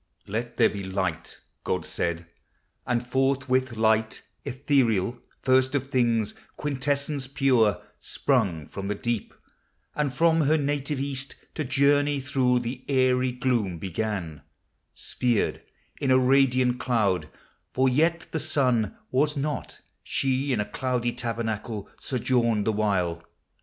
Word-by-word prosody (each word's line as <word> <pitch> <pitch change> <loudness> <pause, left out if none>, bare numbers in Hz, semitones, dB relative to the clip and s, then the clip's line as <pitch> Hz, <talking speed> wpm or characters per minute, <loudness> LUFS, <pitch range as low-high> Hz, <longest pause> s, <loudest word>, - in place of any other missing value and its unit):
Let 115 +3 -4
there - - +6
be 100 -1 -5
light," 95 -3 -3 0.3
God - - -1
said; 85 0 -2 0.6
and 120 -1 0
forthwith 130 -1 +1
Light 110 0 +2 0.2
Ethereal, 125 -5 +1 0.2
first 130 +1 +3
of 135 0 -2
things, 115 -4 +2 0.2
quintessence 140 0 -1
pure, 130 -6 +3 0.2
Sprung 80 -5 0
from 100 +5 -6
the 105 - -1
deep; 120 0 -2 0.6
and 150 -2 0
from 165 +5 +3
her 155 +2 +3
native 145 -1 -1
east 140 0 -3 0.2
To 155 - -2
journey 145 +1 +3
through 130 -2 +1
the 125 +2 -5
aery 130 -1 +3
gloom 120 -8 0
began, 90 -3 -3 0.5
Sphered 120 -4 0 0.4
in 135 - -1
a 130 - +6
radiant 130 -1 +3
cloud, 100 - +1 0.4
for 130 +1 +2
yet 160 +6 +2
the 160 - -1
Sun 130 -7 +1
Was 150 +3 +1
not; 145 +1 -3 0.2
she 135 +1 0
in 120 - +1
a 105 - 0
cloudy 120 +2 -1
tabernacle 115 -3 -3
Sojourned 120 -4 +1
the 110 - +1
while. 90 -5 0
125 Hz, 125 wpm, -26 LUFS, 110-135 Hz, 0.6 s, there